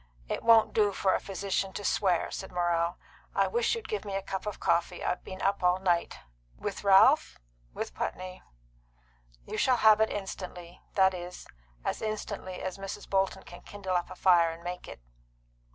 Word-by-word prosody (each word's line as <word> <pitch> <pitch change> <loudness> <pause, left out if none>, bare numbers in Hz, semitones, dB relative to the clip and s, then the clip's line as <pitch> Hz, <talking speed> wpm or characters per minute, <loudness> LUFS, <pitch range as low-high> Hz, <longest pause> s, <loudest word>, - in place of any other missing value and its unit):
"It - - -3
won't 225 -1 +5
do 210 -2 +3
for 190 0 +2
a - - +1
physician 195 0 -2
to 205 - -5
swear," 180 -4 +1
said 190 - -6
Morrell. 175 -1 0 0.4
"I - - +4
wish 470 0 +1
you'd 450 -1 -6
give 430 - -3
me 200 -2 -5
a 195 - -2
cup 190 +2 -4
of 210 - -4
coffee. 170 - 0
I've - - -1
been 185 0 -8
up 200 +1 +1
all 180 0 +4
night." 175 -3 0 0.4
"With - - -5
Ralph?" 205 +10 +5 0.3
"With - - -5
Putney." 185 0 -5 1.0
"You - - -4
shall 255 -1 +3
have 220 -1 +6
it 220 - +4
instantly; 180 -3 -7
that 190 -1 +5
is, 180 0 -7 0.4
as - - -2
instantly 205 -3 -4
as 185 +1 -4
Mrs. 195 0 -6
Bolton 190 0 0
can 175 - -12
kindle 190 -3 -4
up 175 - 0
a - - -8
fire 175 -3 +5
and 165 +1 -8
make 180 +1 -6
it." - - -10
190 Hz, 185 wpm, -29 LUFS, 180-205 Hz, 1.0 s, have